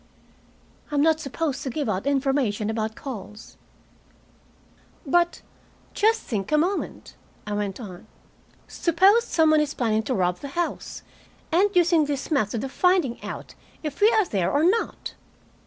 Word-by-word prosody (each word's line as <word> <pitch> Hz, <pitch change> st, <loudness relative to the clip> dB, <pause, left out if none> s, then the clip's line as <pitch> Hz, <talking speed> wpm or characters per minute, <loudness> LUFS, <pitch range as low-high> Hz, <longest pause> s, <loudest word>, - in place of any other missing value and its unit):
"I'm 290 Hz, -1 st, +1 dB
not 320 Hz, 0 st, +3 dB
supposed 285 Hz, -1 st, -3 dB
to 275 Hz, -, -3 dB
give 290 Hz, +2 st, -3 dB
out 200 Hz, +4 st, -2 dB
information 270 Hz, -7 st, 0 dB
about 220 Hz, 0 st, -3 dB
calls." 215 Hz, -4 st, -9 dB, 1.5 s
"But 345 Hz, +4 st, +1 dB, 0.5 s
just 440 Hz, +2 st, +2 dB
think 200 Hz, -1 st, -3 dB
a 305 Hz, -, +4 dB
moment," 365 Hz, +6 st, -2 dB, 0.3 s
I 210 Hz, -, -4 dB
went 205 Hz, 0 st, -3 dB
on. 190 Hz, -7 st, -10 dB, 0.6 s
"Suppose 380 Hz, +7 st, +3 dB
some 320 Hz, -1 st, +3 dB
one 310 Hz, -1 st, +5 dB
is 300 Hz, 0 st, -2 dB
planning 220 Hz, -3 st, +1 dB
to 255 Hz, +3 st, -2 dB
rob 180 Hz, -2 st, 0 dB
the 280 Hz, -, -7 dB
house, 345 Hz, -1 st, -3 dB, 0.5 s
and 375 Hz, +5 st, +4 dB
using 340 Hz, -3 st, +4 dB
this 285 Hz, +1 st, -4 dB
method 220 Hz, -5 st, 0 dB
of 270 Hz, -, -5 dB
finding 360 Hz, -9 st, +2 dB
out -, -, -7 dB, 0.3 s
if 300 Hz, +1 st, -5 dB
we 425 Hz, -, +7 dB
are 435 Hz, -3 st, +3 dB
there 195 Hz, -, -1 dB
or 290 Hz, +2 st, +2 dB
not?" 405 Hz, +7 st, 0 dB
285 Hz, 150 wpm, -24 LUFS, 220-335 Hz, 1.5 s, we